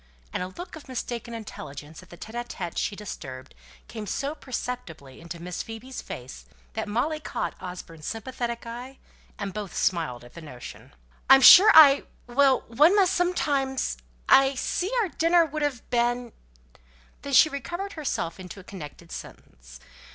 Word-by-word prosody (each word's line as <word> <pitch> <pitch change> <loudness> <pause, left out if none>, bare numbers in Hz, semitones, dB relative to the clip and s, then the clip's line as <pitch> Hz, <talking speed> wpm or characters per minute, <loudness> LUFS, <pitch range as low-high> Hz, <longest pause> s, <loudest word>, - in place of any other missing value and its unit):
and - - -2
a 180 - -2
look 345 - -9
of 315 - -12
mistaken 240 -2 -5
intelligence 155 -8 -9
at 185 - -18
the 175 - -12
tÉte 220 - -10
ł 240 0 -4
tÉte 175 -7 -6
she - - -1
had - - -10
disturbed 130 -10 -8 0.3
came 215 -2 -7
so 280 +7 -2
perceptibly 230 - -6
over 170 0 -8
Miss 175 +1 -5
Phoebe's 225 +4 -8
face 125 - -9 0.3
that - - -3
Molly 255 +9 -1
caught - - -4
Osborne's 180 -4 -8
sympathetic 235 +1 -4
eye, 245 +3 -8 0.4
and 200 -2 -4
both 205 -2 -6
smiled 160 -9 0
at 120 - -15
the 170 - -10
notion. 125 - -11 0.3
"I'm 270 0 +9
sure 375 +10 +10
I 290 -3 +9 0.2
well! 265 +2 +3
one 300 - +4
must 380 -2 +4
sometimes 285 -7 0 0.3
I 270 0 +6
see 360 +8 -2
our 390 - -2
dinner 335 +1 +3
would 310 0 -5
have 285 -5 -2
been 240 -1 0 0.4
" - - -31
Then 280 - -6
she 315 - +7
recovered 345 +8 -5
herself 260 - -3
into 185 +1 -9
a - - -12
connected 170 -2 -10
sentence. - - -11
235 Hz, 165 wpm, -26 LUFS, 170-275 Hz, 0.4 s, sure